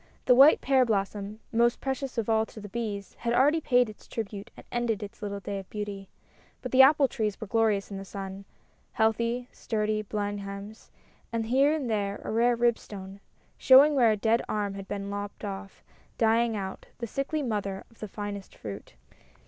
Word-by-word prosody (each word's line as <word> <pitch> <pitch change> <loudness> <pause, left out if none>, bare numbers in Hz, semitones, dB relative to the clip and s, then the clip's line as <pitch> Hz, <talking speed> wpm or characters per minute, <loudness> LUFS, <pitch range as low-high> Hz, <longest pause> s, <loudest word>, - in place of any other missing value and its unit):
The 250 - +6
white 275 +5 +7
pear 265 -1 +4
blossom, 205 -1 -2
most 235 +1 +3
precious 270 -1 -3
of 230 - -1
all 220 -1 +3
to - - -11
the 205 - -8
bees, 205 -2 -4
had 235 0 0
already 295 +5 +4
paid 250 -4 +3
its 215 - -12
tribute 210 -1 -5
and - - -12
ended 235 -3 -1
its 205 +1 -10
little 200 -1 -4
day 200 0 -4
of 190 - -11
beauty. 205 -2 -6 0.5
But 255 - -4
the 260 - +7
apple 275 +1 +6
trees 215 -6 -2
were 220 - -5
glorious 215 -2 +1
in 195 - -4
the - - -6
sun 195 0 -7 0.5
heal 220 0 +5
thy, 235 +2 -2
sturdy 215 -1 -1
Blenheims, 205 0 -5 0.4
and 230 -1 -1
here 270 +5 +4
and 305 -5 -1
there 205 -3 -1
a - - -4
rare 235 +2 +3
Ribstone, 205 -5 -2 0.4
showing 275 +3 +7
where 245 -5 +5
a 215 - 0
dead 225 +3 +2
arm 205 -2 -1
had 195 0 -8
been 200 0 -4
lopped 205 +1 -5
off, 195 0 -7 0.3
dying 230 0 +3
out, 190 -2 -5
the 235 - -4
sickly 275 +6 -2
mother 200 -5 -2
of 230 - -23
the 215 - -5
finest 205 -1 -6
fruit. 100 - -8
215 Hz, 190 wpm, -28 LUFS, 200-240 Hz, 0.5 s, white